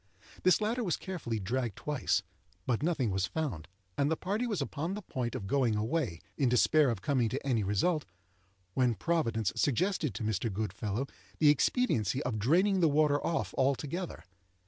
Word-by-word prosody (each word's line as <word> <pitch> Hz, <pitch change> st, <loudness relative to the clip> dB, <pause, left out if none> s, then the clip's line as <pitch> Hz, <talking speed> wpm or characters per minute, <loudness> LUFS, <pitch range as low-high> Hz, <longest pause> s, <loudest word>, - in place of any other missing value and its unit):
This 185 Hz, +3 st, +4 dB
latter 230 Hz, +4 st, 0 dB
was 175 Hz, -7 st, 0 dB
carefully 145 Hz, -, -4 dB
dragged 115 Hz, +2 st, -2 dB
twice, 145 Hz, -9 st, 0 dB, 0.4 s
but 120 Hz, -1 st, 0 dB
nothing 145 Hz, -, +1 dB
was 95 Hz, -1 st, 0 dB
found; 130 Hz, -, -3 dB, 0.3 s
and 140 Hz, +1 st, +3 dB
the 160 Hz, -, 0 dB
party 210 Hz, +6 st, -1 dB
was 210 Hz, -5 st, -1 dB
upon 165 Hz, +6 st, -3 dB
the 210 Hz, -, -6 dB
point 125 Hz, -7 st, -3 dB
of 115 Hz, -6 st, -4 dB
going 125 Hz, 0 st, +2 dB
away, 110 Hz, -, -1 dB, 0.2 s
in 135 Hz, -, +3 dB
despair 140 Hz, +4 st, +4 dB
of 110 Hz, -4 st, -3 dB
coming 125 Hz, -4 st, +2 dB
to 135 Hz, +3 st, -4 dB
any 115 Hz, -5 st, +2 dB
result, 145 Hz, -, +1 dB, 0.7 s
when 125 Hz, -1 st, +2 dB
Providence 115 Hz, -, 0 dB
suggested 165 Hz, -, +1 dB
to -, -, -4 dB
Mr. 110 Hz, +1 st, -1 dB
Goodfellow 105 Hz, +4 st, -2 dB, 0.3 s
the 150 Hz, -, +5 dB
expediency 140 Hz, -, +2 dB
of 120 Hz, -3 st, -2 dB
draining 185 Hz, -, +3 dB
the 165 Hz, -3 st, +4 dB
water 145 Hz, 0 st, +3 dB
off 165 Hz, -, -1 dB
altogether. 140 Hz, +6 st, -1 dB
135 Hz, 170 wpm, -31 LUFS, 110-165 Hz, 0.7 s, the